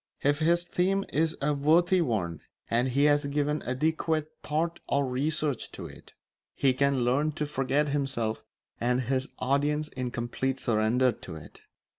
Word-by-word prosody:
If 145 +1 +2
his 170 +2 +3
theme 190 +3 0
is 160 +2 +1
a 150 +1 +2
worthy 170 +6 +3
one 95 - -1 0.3
and 120 +2 +2
he 135 +3 +2
has 145 -1 +3
given 145 +1 0
adequate 155 +3 0
thought 165 +3 -1
or 140 - +2
research 145 +1 -1
to - - -7
it, - - -13 0.4
he 135 -2 +3
can 140 0 +2
learn 145 +5 +1
to 150 - -2
forget 145 +1 0
himself 135 -6 -1 0.4
and 125 +2 +1
his 130 +1 -1
audience 145 +3 0
in 125 -1 -4
complete 125 +3 -2
surrender 120 +3 +2
to 80 - -9
it. 80 - -12
140 Hz, 155 wpm, -28 LUFS, 125-155 Hz, 0.4 s, his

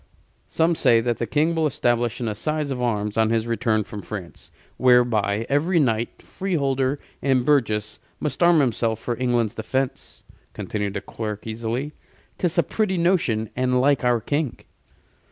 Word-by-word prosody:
"Some 165 +1 +2
say 115 -7 +4
that 120 0 -1
the 115 - -1
King 155 +3 +1
will 160 -1 +1
establish 120 -4 0
an 120 - -2
assize 150 +7 -2
of 125 -2 -3
arms 105 -3 -1
on 110 -1 +3
his 115 0 +1
return 115 -1 0
from 105 0 -8
France, 95 -4 -8 0.3
whereby 115 -4 +3
every 165 +6 +2
knight, 115 -5 0
freeholder, 140 -7 -1 0.2
and 130 -3 +2
burgess 110 -7 +1 0.2
must 150 -1 -3
arm 170 -2 +6
himself 115 -4 0
for 120 - -3
England's 120 -4 +1
defense," 130 +4 -3 0.3
continued 105 -1 -3
the - - -2
clerk, 105 -2 -6
easily. 115 +6 -3 0.5
"'Tis 175 0 0
a 170 - +5
pretty 205 -4 -1
notion, 160 - +1
and 125 0 +1
like 135 0 +3
our 120 -1 +3
King." 145 +2 -2
125 Hz, 155 wpm, -23 LUFS, 110-145 Hz, 0.5 s, arm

